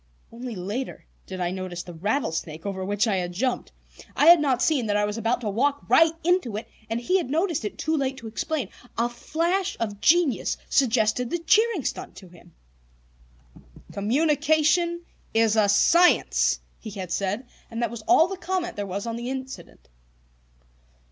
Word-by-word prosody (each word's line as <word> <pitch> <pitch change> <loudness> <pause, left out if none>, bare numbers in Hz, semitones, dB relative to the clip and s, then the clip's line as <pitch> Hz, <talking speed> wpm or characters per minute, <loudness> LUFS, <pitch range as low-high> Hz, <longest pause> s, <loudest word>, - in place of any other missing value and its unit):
Only 240 0 -7
later 205 +8 -5 0.2
did 185 -1 -6
I 175 -1 -1
notice 185 -2 -5
the 175 - -10
rattlesnake 165 - -2
over 190 -2 -3
which 205 +4 0
I 200 -3 +1
had 180 -1 -3
jumped. 245 +7 -2 0.4
I - - +3
had 340 +1 +9
not 265 -4 +1
seen 275 -8 +1
that 205 0 +1
I 210 - +2
was 210 0 -3
about 230 +2 -1
to 215 - -2
walk 280 +7 0
right 325 0 +5
into 340 - +1
it, 220 - -6 0.2
and 225 +1 -1
he 365 +11 +1
had 300 - -4
noticed 325 - 0
it 210 - -5
too 315 +1 -1
late 270 -2 -1
to 235 - -11
explain. 240 - -3 0.3
A 235 +1 +2
flash 340 +10 -1
of 205 -3 -4
genius 330 -5 +3
suggested 235 -2 +2
the 345 - -1
cheering 395 - +2
stunt - - -4
to 185 - -13
him. 175 -1 -19 1.4
"Communication 310 - +1 0.3
is 225 -1 +3
a 210 -2 +3
science!" 340 - +4 0.2
he 220 - -8
had 190 -4 -7
said, 200 +7 -2 0.2
and 230 - -6
that 235 - -1
was 235 -2 -7
all 350 -2 +6
the 385 0 -6
comment 365 - -3
there 205 -1 -3
was 200 +3 -4
on 230 0 -3
the 240 +1 -5
incident. 265 0 -8
240 Hz, 175 wpm, -25 LUFS, 205-315 Hz, 1.4 s, had